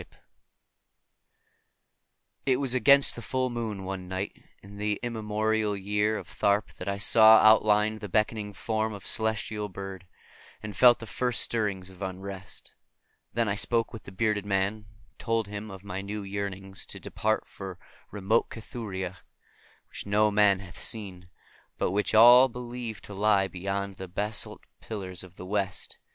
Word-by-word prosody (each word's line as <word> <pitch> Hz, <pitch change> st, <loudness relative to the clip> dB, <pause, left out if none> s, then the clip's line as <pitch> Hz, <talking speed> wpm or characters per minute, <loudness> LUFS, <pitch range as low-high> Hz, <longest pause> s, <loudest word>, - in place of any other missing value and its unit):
10em -, -, -15 dB
0 -, -, -26 dB, 2.3 s
0;">I 135 Hz, -, +2 dB
t -, -, +1 dB
was 135 Hz, -2 st, +2 dB
against 140 Hz, +3 st, +5 dB
the 120 Hz, -, -7 dB
full 130 Hz, +1 st, -1 dB
moon 110 Hz, -5 st, -4 dB
one 95 Hz, -1 st, -5 dB
night 95 Hz, +2 st, -4 dB, 0.3 s
in 100 Hz, +1 st, -12 dB
the 105 Hz, 0 st, -1 dB
immemorial 110 Hz, -2 st, -1 dB
year 105 Hz, +2 st, 0 dB
of 90 Hz, -, -8 dB
Tharp 100 Hz, +4 st, 0 dB
that 90 Hz, -, -7 dB
I 100 Hz, 0 st, -1 dB
saw 110 Hz, +2 st, +7 dB
outlined 110 Hz, 0 st, +4 dB
the 105 Hz, -1 st, -7 dB
beckoning 105 Hz, +1 st, 0 dB
form 110 Hz, +2 st, -2 dB
of 100 Hz, -, -9 dB
the -, -, -5 dB
celestial 110 Hz, -1 st, -2 dB
bird, 95 Hz, -1 st, -8 dB, 0.6 s
and 105 Hz, -2 st, -6 dB
felt 120 Hz, +3 st, +7 dB
the 115 Hz, -, -9 dB
first 120 Hz, +2 st, 0 dB
stirrings 100 Hz, -5 st, -1 dB
of 95 Hz, +1 st, -16 dB
unrest. 95 Hz, 0 st, -7 dB, 0.6 s
Then 115 Hz, -1 st, +1 dB
I 100 Hz, -, +1 dB
spoke 115 Hz, +3 st, 0 dB
with 115 Hz, -, -9 dB
the -, -, -9 dB
bearded 105 Hz, +1 st, 0 dB
man, 100 Hz, 0 st, +1 dB
and 105 Hz, -1 st, -14 dB, 0.3 s
told 115 Hz, -2 st, -1 dB
him 105 Hz, +1 st, -6 dB
of 95 Hz, -1 st, -10 dB
my 95 Hz, -1 st, -5 dB
new 100 Hz, +1 st, -5 dB
yearnings 95 Hz, -1 st, -5 dB
to -, -, -6 dB
depart 110 Hz, 0 st, -1 dB
for 95 Hz, -2 st, -8 dB, 0.3 s
remote 105 Hz, +3 st, +1 dB
Cathuria, 95 Hz, -5 st, -6 dB, 0.7 s
which -, -, -9 dB
no 105 Hz, +1 st, +3 dB
man 100 Hz, -2 st, +4 dB
hath 90 Hz, -3 st, -11 dB
seen, 95 Hz, -5 st, -2 dB, 0.5 s
but -, -, 0 dB
which 105 Hz, +2 st, 0 dB
all 120 Hz, +4 st, +9 dB
believe 120 Hz, -2 st, -6 dB
to 105 Hz, -, -10 dB
lie 100 Hz, -1 st, +3 dB
beyond 100 Hz, +2 st, -4 dB
the 95 Hz, -, -7 dB
basalt 105 Hz, +4 st, -2 dB, 0.2 s
pillars 95 Hz, -5 st, -4 dB
of 90 Hz, -1 st, -14 dB
the 90 Hz, -, -9 dB
West. 95 Hz, -1 st, -3 dB
105 Hz, 165 wpm, -28 LUFS, 95-110 Hz, 2.3 s, all